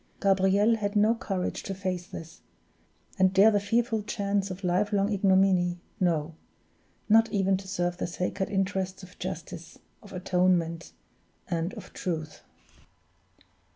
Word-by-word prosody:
Gabriel 195 +3 +3
had 205 -1 -3
not 220 +3 +3
courage 185 -3 -3
to 195 - -5
face 185 -2 -3
this, 165 -2 -10 0.8
and 190 0 +3
dare 205 +3 +7
the 205 - +2
fearful 225 +2 0
chance 200 -2 -1
of 185 +1 -7
life 185 +4 +1
long 205 +1 +1
ignominy 190 -2 +3 0.2
no, 165 -3 0 0.7
not 225 +1 +5
even 195 -1 +2
to 190 0 -6
serve 175 -2 -1
the - - -2
sacred 180 +2 -3
interests 190 -1 -2
of 185 0 -14
justice, 175 -2 -7 0.2
of 205 - -14
atonement, 180 -3 0 0.6
and 170 +5 -1
of 210 -4 -11
truth. 155 -4 -4
190 Hz, 135 wpm, -28 LUFS, 180-205 Hz, 0.8 s, dare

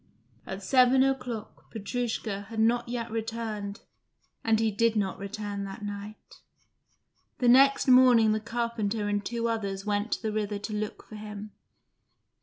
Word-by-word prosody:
At 190 +1 -6
seven 255 +4 +5
o'clock 250 -5 -3
Petrushka 220 -2 -3
had 225 -1 -5
not 235 +2 +2
yet 235 -1 -3
returned, 225 -2 -4 0.6
and 225 -1 +3
he 225 -1 +2
did 230 +2 +2
not 195 -3 -1
return 200 0 -5
that 195 +2 -7
night. 205 +1 -8 1.0
The 245 - +1
next 270 +4 +6
morning 250 -4 +6
the 215 - +1
carpenter 225 -2 -2
and 205 0 0
two 235 +3 -2
others 200 -4 -3
went 205 +1 -1
to - - -3
the 220 - -1
river 210 -1 -1
to 205 +2 -6
look 210 0 -4
for 215 - -9
him. 210 0 -8
220 Hz, 150 wpm, -28 LUFS, 205-235 Hz, 1.0 s, next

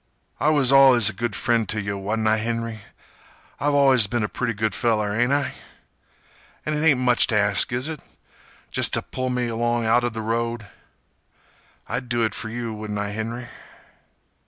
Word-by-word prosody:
"I 150 - +2
was 140 -4 +3
allus 130 -5 +7
a - - -15
good 115 +1 -4
friend 115 -4 0
t' 110 - -2
yeh, 100 -1 -3
wa'n't 105 +3 -2
I, 110 0 +3
Henry? 115 0 -3 0.8
I've 145 0 0
allus 135 -6 +5
been 120 +1 -1
a - - 0
pretty 115 +1 -3
good 110 +1 -1
feller, 105 -4 0
ain't 120 +4 +1
I? 145 0 0 1.1
An' 155 - -1
it 150 - -2
ain't 150 -5 +4
much 125 -1 +3
t' 115 - -1
ask, 100 0 +3
is 125 +3 -1
it? 160 -3 -6 0.7
Jest - - +3
t' - - -1
pull 130 0 -3
me 125 -1 -1
along 120 0 -1
outer 120 +2 +2
th' 115 - -15
road? 115 0 -2 1.2
I'd 125 0 -4
do 120 -1 0
it 110 -2 -1
fer 110 - -6
you, 115 0 -5
wouldn't 105 -1 -6
I, 100 0 -3
Henry?" 115 +3 -5
115 Hz, 180 wpm, -23 LUFS, 110-125 Hz, 1.2 s, allus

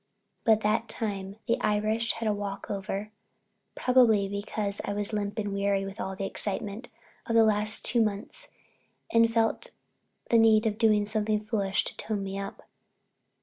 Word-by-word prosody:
But 220 -1 +5
that 220 +2 +1
time 200 -3 -4
the 235 - +1
Irish 215 +2 +1
had 225 -1 -3
a 210 - +2
walk 200 -1 -5
over, 200 +1 -4 0.6
probably 235 -6 +4
because 200 0 -3
I 205 - -2
was 205 +1 -2
limp 205 0 -2
and 205 -2 -2
weary 200 0 0
with 195 +1 -8
all 190 - -4
the 195 - -3
excitement 205 +4 -2 0.4
of 230 - 0
the 225 - +7
last 215 0 +1
two 235 - +3
months 215 - -3 0.7
and 230 0 +5
felt 225 -1 +1 0.6
the 230 - +6
need 220 0 +5
of 215 -1 -1
doing 215 -2 +4
something 210 0 0
foolish 210 -3 0
to - - -7
tone 210 -2 -3
me 195 0 -4
up. 195 0 -7
210 Hz, 165 wpm, -28 LUFS, 200-225 Hz, 0.7 s, the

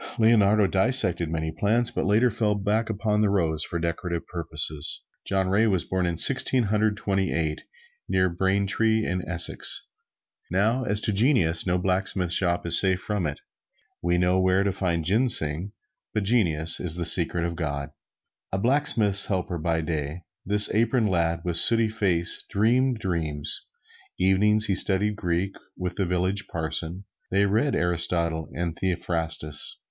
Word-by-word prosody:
Leonardo 110 -2 +4
dissected 95 -5 +3
many 80 0 -3
plants, 115 +7 0
but - - -2
later 115 +5 +3
fell 105 0 0
back 105 +3 -1
upon 105 0 -1
the 105 - +2
rose 80 -5 0
for 85 - -4
decorative 85 0 -3
purposes. 80 -3 -1 0.2
John 95 -1 0
Ray 105 +4 +2
was 95 -5 +1
born 95 -1 -1
in 85 -1 -3
Sixteen 130 +3 +2
Hundred 105 0 0
Twenty 95 -2 -1
eight 80 -2 -2 0.5
near 95 0 +2
Braintree 100 +5 0
in 90 +1 -2
Essex. 85 -1 0 0.6
Now, 110 +8 +1
as 105 -3 0
to 105 - 0
genius 100 - +2
no 90 0 +1
blacksmith 90 -1 0
shop 85 -1 +2
is 85 - +6
safe 95 -1 +1
from 100 -4 -3
it. 70 -1 -6 0.6
We 85 +1 0
know 90 +1 +2
where 95 +1 +2
to 100 - 0
find 85 -4 -2
ginseng, 95 - +1 0.4
but 105 - 0
genius 85 -8 +2
is 85 -3 -3
the 85 -1 -4
secret 85 0 +2
of 85 0 -4
God. 70 -4 -4 0.6
A 95 - -1
blacksmith's 110 -4 +2
helper 90 -3 -3
by 80 +1 -1
day, 80 +1 -4 0.2
this 105 +2 +3
aproned 115 -1 +1
lad 85 -1 0
with 85 -1 0
sooty 115 +5 +6
face 95 -6 -1
dreamed 125 +4 +1
dreams. 80 -7 -3 0.5
Evenings 105 +3 +2
he 100 - 0
studied 100 +2 0
Greek 90 0 -2 0.2
with 90 -1 -4
the 95 - 0
village 90 +3 -1
parson. 85 +3 -3 0.3
They 100 +2 +2
read 115 +7 +1
Aristotle 85 -2 -1
and 85 -1 -3
Theophrastus. 80 -4 -3
95 Hz, 155 wpm, -25 LUFS, 85-105 Hz, 0.6 s, is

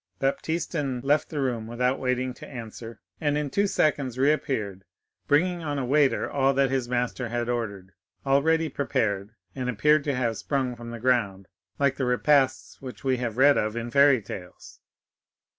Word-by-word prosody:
Baptistin 145 -1 -1
left 145 +2 +2
the 150 - -4
room 120 -5 -1
without 125 +3 0
waiting 125 0 -1
to - - -11
answer, 115 -2 -9 0.2
and 145 -1 0
in 150 -2 -2
two 200 0 +2
seconds 140 -9 0
reappeared, 130 -9 0 0.4
bringing 175 +4 +2
on 145 -3 -3
a 135 - -1
tray, 145 0 +3
all 135 -1 +1
that 135 -1 +2
his 130 -3 -1
master 125 0 -1
had 120 0 -2
ordered, 100 -6 -4 0.3
ready 160 +4 +3
prepared, 110 -7 -2 0.2
and 125 -1 -3
appearing 150 +7 +3
to 140 -1 -2
have 120 -3 -1
sprung 130 -3 -1
from 120 0 -9
the 115 0 -7
ground, 105 -6 0 0.3
like 140 -1 +1
the 130 - -1
repasts 135 +2 +1
which 130 -2 -9
we 130 -2 0
read 130 +5 +4
of 110 +1 -2
in 120 0 -4
fairy 140 -4 +5
tales. 90 -3 -10
130 Hz, 165 wpm, -26 LUFS, 120-145 Hz, 0.4 s, fairy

